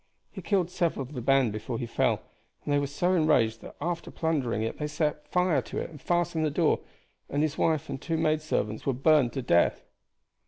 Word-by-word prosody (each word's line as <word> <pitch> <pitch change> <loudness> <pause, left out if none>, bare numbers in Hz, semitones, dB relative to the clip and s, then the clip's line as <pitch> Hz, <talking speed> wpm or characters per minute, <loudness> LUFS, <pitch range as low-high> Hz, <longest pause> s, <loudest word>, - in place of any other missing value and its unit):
He - - -8
killed 185 -4 0
several 170 -6 0
of 130 +3 -11
the 125 - -4
band 135 -2 +3
before 110 +3 -4
he 120 - -3
fell, 115 - 0 0.4
and 145 - 0
they 145 - +4
were 140 - -1
so 175 +6 0
enraged 125 -10 +3
that - - -11
after 170 +2 -3
plundering 135 -10 -1
it 115 - -4
they 150 - -1
set 150 0 -1
it - - -2
on 180 -6 +3
fire - - -4
and 150 -4 -10
fastened 175 -2 0
the 155 - +2
door, 145 - +2 0.5
and 145 +2 0
his 155 -1 0
wife 160 -3 +1
and 135 -2 -5
two 165 -1 -1
maid 155 -1 +1
servants 110 -8 -2
were 135 - +3
burned 135 -1 +4
to 135 - -3
death." 85 -7 +3
150 Hz, 220 wpm, -28 LUFS, 130-160 Hz, 0.5 s, they